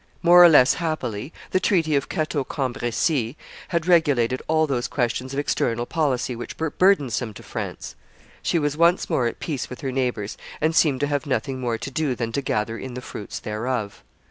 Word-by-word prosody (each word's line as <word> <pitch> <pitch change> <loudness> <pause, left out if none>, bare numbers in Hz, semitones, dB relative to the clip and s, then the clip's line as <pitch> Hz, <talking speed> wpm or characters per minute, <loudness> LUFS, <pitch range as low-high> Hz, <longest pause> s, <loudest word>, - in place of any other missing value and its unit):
More 175 +1 +8
or 175 - +9
less 145 -3 +6
happily, 145 -7 -3 0.2
the 185 - +3
treaty 165 -6 +2
of 140 - 0
Cateau 155 -2 -1
Cambreis 125 0 -1 0.4
had 170 -2 -1
regulated 140 -8 +3
all 160 0 +3
those 130 -5 -1
questions 125 0 -2
of 135 - -5
external 120 -4 0
policy 130 -5 -1
which 120 - -7
were 160 -2 -2
burdensome 135 - +2
to - - -11
France; - - -6 0.5
she - - +1
was 145 -2 0
once 170 +3 +3
more 120 - +2
at - - -5
peace 145 -6 -4
with 125 - -8
her 135 - -2
neighbors, 125 -6 -2 0.2
and 160 +1 +1
seemed 145 -6 +3
to - - +3
have 145 -1 -2
nothing 135 -1 -1
more 120 -2 -1
to 135 - -6
do 150 -3 -1
than 115 -1 -3
to 140 - -1
gather 115 -3 -2
in 130 -2 -7
the - - -4
fruits 105 - -7
thereof. 110 0 -3
135 Hz, 195 wpm, -23 LUFS, 120-155 Hz, 0.5 s, or